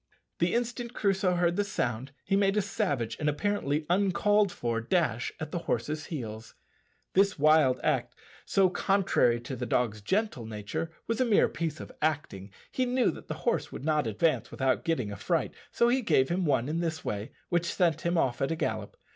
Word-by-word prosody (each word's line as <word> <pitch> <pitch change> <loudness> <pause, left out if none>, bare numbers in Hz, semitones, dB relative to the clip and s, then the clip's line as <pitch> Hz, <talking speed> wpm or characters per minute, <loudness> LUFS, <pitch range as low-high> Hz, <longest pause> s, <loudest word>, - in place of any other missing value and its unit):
The 170 +4 +2
instant 240 0 -2
Crusoe 190 -2 +1
heard 175 0 +1
the 205 - +3
sound 140 - -2
he 195 - +1
made 200 0 +2
a - - +4
savage 145 - -1
and 150 - +1
apparently 150 -3 -1
uncalled 200 +2 +3
for 115 -5 -2
dash 120 -4 0
at 155 - -5
the 175 - -2
horse's 150 +6 -1
heels. 115 -7 -6 0.6
This 200 +1 +3
wild 150 -4 +4
act, - - 0 0.3
so 195 -1 +3
contrary 185 -13 +2
to 130 +2 -6
the 125 0 -4
dog's 110 -3 0
gentle 190 - -1
nature, 105 +9 -4 0.2
was 230 +2 -1
a - - +6
mere 230 -5 +4
piece 160 0 -3
of - - -8
acting. 145 -11 -2 0.2
He 255 - 0
knew 250 0 +2
that - - -11
the - - -4
horse - - 0
would - - -7
not 150 -5 +1
advance 155 +10 +1
without 130 -1 0
getting 130 -11 -1
a - - -5
fright, - - -1 0.2
so 235 - +3
he 255 +2 +2
gave 150 - +3
him 180 +1 0
one 130 -4 +2
in 160 +3 -1
this 165 -2 -3
way, 105 +1 -3 0.2
which 175 -1 +1
sent 165 -4 +1
him 170 0 0
off 125 -6 +1
at 135 - +1
a - - 0
gallop. 110 -9 -3
160 Hz, 195 wpm, -29 LUFS, 125-195 Hz, 0.6 s, a